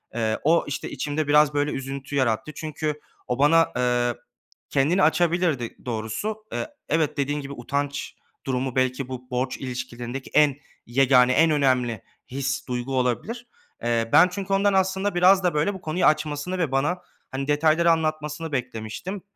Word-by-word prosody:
eee, 110 -2 0
o, 165 +3 +4
işte, 145 - -4
içimde 150 0 -2
biraz, 150 0 +5
böyle, 145 0 0
üzüntü 135 +1 -5
yarattı. 130 +1 0
Çünkü 155 -1 -3 0.3
o, 125 +1 -2
bana, 165 +3 +5
eee, 120 -1 +1 0.5
kendini 155 +8 +2
açabilirdi 170 -3 +2 0.2
ı - - -25
doğrusu. 125 - -4
E - - -2 0.2
evet, 155 -1 +1
dediğin 145 +1 -1
gibi, 140 0 -7
utanç 140 +3 -3 0.3
durumu 130 -1 -2
belki 130 0 0
bu 125 -1 -8
borç 125 +1 -1
ilişkilerindeki 125 0 -6
en 150 -2 +5 0.3
yegâne, 130 0 +4
en 160 +4 +4
önemli 125 -6 +1 0.3
his, 135 +1 -2
duygu 125 +1 -2
olabilir. 220 - -2 0.4
Eee, 115 -1 0
ben 175 - +8
çünkü 195 +1 -3
ondan 200 +1 +3
aslında 190 +1 +1
biraz 185 +2 +5
da, 180 - +2
böyle, 150 +7 +1
bu 190 - -9
konuyu 160 +3 0
açmasını 155 +3 +1
ve 165 -6 -1
bana, 145 +7 +1 0.3
hani, 135 +1 -3
detayları 155 +3 +3
anlatmasını 155 0 -2
beklemiştim. 125 - -4
145 Hz, 155 wpm, -24 LUFS, 130-165 Hz, 0.5 s, ben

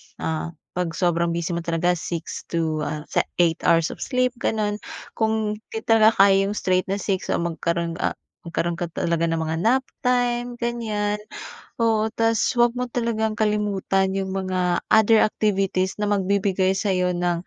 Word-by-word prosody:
ah, 160 +1 -3 0.2
'pag 175 -2 -3
sobrang 170 -1 +1
busy 170 +1 -2
mo 170 - -1
talaga, 170 +1 0
6 170 -1 -5
to, 160 -2 -1
ah, 150 0 -4
se - - +2 0.2
8 170 -2 +2
hours 165 -1 +3
of - - -10
sleep, 255 -1 0
gano'n. 210 -2 -1 0.3
Kung 220 -1 -1 0.2
'di 220 - -3
talaga 220 -1 +5
kaya 195 0 +4
'yung 205 - -3
straight 185 -1 +1
na 195 - 0
6 195 -2 -2
o - - +1
magkaroon, 170 0 -2
ah, - - -1 0.3
magkaroon 170 0 -2
ka 175 - -2
talaga 170 0 0
ng 165 -1 -1
mga 160 0 -2
nap 230 +10 +3 0.2
time, 245 -1 +1
ganyan. 215 -3 -1 0.6
Oo. 220 -1 +2
Tas 225 0 +1 0.2
'wag 240 0 +4
mo 250 0 -3
talagang 225 -2 -1
kalimutan 205 -3 +1
'yung 190 0 -3
mga 185 -2 0
other 220 0 +6
activities 195 -3 0
na 210 - +1
magbibigay 195 -1 +1
sa'yo 185 -3 0
ng, 175 0 -1
195 Hz, 165 wpm, -23 LUFS, 170-220 Hz, 0.6 s, other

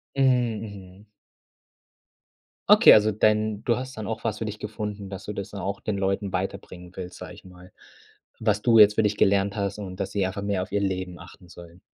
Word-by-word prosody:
Mm, 125 -5 +2
mhm. 100 -2 -11 1.6
Okay, - - +9
also 110 0 +5
dein 105 0 +1
du 120 - +2
hast 130 -1 -7
dann 110 - -5
auch 110 0 -5
was 105 -1 -2
für 110 - -4
dich 105 0 -6
gefunden, 105 -2 -6
dass 95 0 -8
du 105 - -5
das 100 0 -6
dann 100 -1 -7
auch 100 +1 -4
den 105 -2 -3
Leuten 95 0 -1
weiterbringen 90 -1 -5
willst, 90 -1 -8
sage - - -9
ich - - -15
mal, 90 0 -15 0.7
was 105 -2 0
du 115 -1 +5
jetzt 105 0 +7
für 110 - +2
dich 105 0 0
gelernt 100 0 +2
hast 100 -1 -2
und, 95 -3 -8
dass 95 0 -3
sie 100 -2 0
einfach 95 +2 -4
mehr 100 -2 -1
auf 95 - -11
ihr 100 0 0
Leben 95 -2 -3
achten 90 -3 -14
sollen. 85 0 -14
100 Hz, 210 wpm, -25 LUFS, 95-105 Hz, 1.6 s, Okay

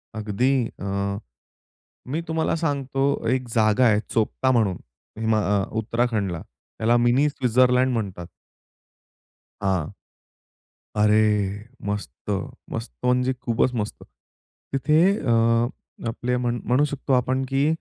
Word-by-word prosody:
अगदी 110 +5 0 0.3
अ, 100 0 -2 0.9
मी 150 +6 -2
तुम्हाला 160 0 0
सांगतो 140 -4 -1 0.3
एक 130 0 +1
जागा 110 +2 +4
आहे, 105 -2 +4
चोपता 115 +4 +1
म्हणून 110 -8 +2 0.4
हिमा 110 -1 +2 0.2
अ - - 0
उत्तराखंडला 110 -6 -1
त्याला 110 - -2
मिनी 120 +5 +3
स्वित्झरलँड 125 -1 +3
म्हणतात. 95 -7 -3 1.4
हां. 95 -6 0 1.1
अरे 105 -1 +2 0.2
मस्त, 105 0 -3 0.6
मस्त - - -4
म्हणजे 125 +1 +2
खूपच 120 +2 +1
मस्त. 105 -3 -4 0.7
तिथे 150 +4 +3 0.2
अ, 125 -5 -1 0.8
आपले 125 +2 -1
म्हण 120 -1 -1
म्हणू 125 +4 +3
शकतो 140 -1 -2
आपण 130 +1 +2
की 135 +2 +2
120 Hz, 110 wpm, -24 LUFS, 105-130 Hz, 1.4 s, जागा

